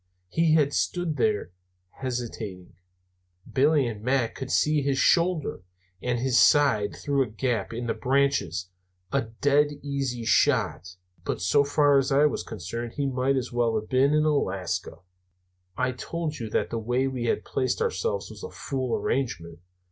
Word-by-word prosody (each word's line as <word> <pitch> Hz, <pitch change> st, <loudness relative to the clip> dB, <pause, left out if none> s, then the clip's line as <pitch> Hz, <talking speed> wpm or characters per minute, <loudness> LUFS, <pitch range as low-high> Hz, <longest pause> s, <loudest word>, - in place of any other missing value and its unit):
As -, -, -22 dB
he 160 Hz, -3 st, +4 dB
stood 175 Hz, +1 st, -1 dB
there, 105 Hz, -6 st, 0 dB, 0.5 s
hesitating, 115 Hz, -8 st, -5 dB, 0.8 s
Billy 145 Hz, +1 st, +4 dB
and 110 Hz, -3 st, -4 dB
Mac 125 Hz, 0 st, +1 dB
could 135 Hz, -1 st, -6 dB
see 150 Hz, +1 st, +2 dB
his 140 Hz, -1 st, 0 dB
shoulder 170 Hz, -, +2 dB, 0.4 s
and 125 Hz, 0 st, -1 dB
his 125 Hz, +1 st, +2 dB
side 110 Hz, -9 st, +4 dB
through 140 Hz, -2 st, 0 dB
a 130 Hz, -, 0 dB
gap 115 Hz, -1 st, -2 dB
in 120 Hz, +1 st, -4 dB
the 115 Hz, -, 0 dB
branches 130 Hz, -, 0 dB, 0.4 s
a 140 Hz, -, +2 dB, 0.2 s
dead 145 Hz, +1 st, +4 dB, 0.2 s
easy 135 Hz, -4 st, -3 dB
shot. 90 Hz, -5 st, +2 dB, 0.3 s
But -, -, -2 dB
so 95 Hz, +12 st, +3 dB
far 145 Hz, -1 st, +4 dB
as 135 Hz, +1 st, -1 dB
I 140 Hz, +2 st, +5 dB
was 150 Hz, -, 0 dB
concerned, 115 Hz, +7 st, -6 dB
he 145 Hz, -, -2 dB
might 135 Hz, 0 st, +1 dB
as 130 Hz, -2 st, -2 dB
well 120 Hz, -2 st, +1 dB
have 110 Hz, -, -11 dB
been 135 Hz, +3 st, +3 dB
in 150 Hz, 0 st, +3 dB
Alaska. 95 Hz, -, -1 dB, 0.8 s
I 130 Hz, 0 st, +1 dB
told 155 Hz, +4 st, -4 dB
you 115 Hz, -2 st, -4 dB
that -, -, -1 dB
the 115 Hz, -, -1 dB
way 125 Hz, +4 st, 0 dB
we 130 Hz, -3 st, -3 dB
had -, -, 0 dB
placed 130 Hz, -1 st, -1 dB
ourselves 465 Hz, +1 st, -1 dB
was -, -, -11 dB
a 460 Hz, -, -6 dB
fool 130 Hz, -, -3 dB
arrangement. 85 Hz, -11 st, -2 dB
130 Hz, 165 wpm, -26 LUFS, 115-145 Hz, 0.8 s, I